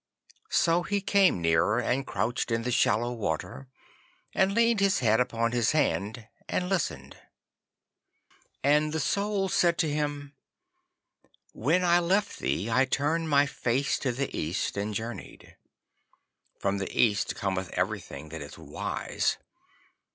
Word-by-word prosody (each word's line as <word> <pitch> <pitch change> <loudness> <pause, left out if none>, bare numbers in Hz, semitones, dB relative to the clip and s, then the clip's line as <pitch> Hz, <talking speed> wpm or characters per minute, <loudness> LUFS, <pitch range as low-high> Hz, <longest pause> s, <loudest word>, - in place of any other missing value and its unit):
So 170 0 +3
he 205 +3 -1
came 195 - +3
nearer, 85 +7 +3
and 125 +3 0
couched 110 +7 -1
in 115 0 0
the 125 - -2
shallow 115 +1 +2
water, 100 - -4 0.7
and 190 0 +2
leaned 230 -1 +3
his 195 -1 +3
head 110 -2 +3
upon 115 -2 0
his 120 +1 +1
hand 110 -7 -1 0.2
and 180 - -1
listened. 190 -4 -2 1.5
And 150 +2 +3
the 160 - -1
Soul 200 +6 0
said 175 -2 +2
to 165 - +1
him, 145 -1 -3 1.2
'When 180 0 +1
I 175 0 +5
left 195 +4 0
thee 80 +10 -1
I 125 +4 +3
turned 155 +5 0
my 145 -1 +5
face 135 -1 -1
to 130 - -1
the 135 +3 -3
East 80 +6 -2
and 105 +1 -3
journeyed. 115 +3 -7 1.0
From 100 0 -1
the 95 - -3
East 105 -4 +2
cometh 95 -2 -2
everything 80 - -3
that 80 0 -7
is 70 - -9
wise. 75 -3 -2
125 Hz, 135 wpm, -28 LUFS, 105-165 Hz, 1.5 s, I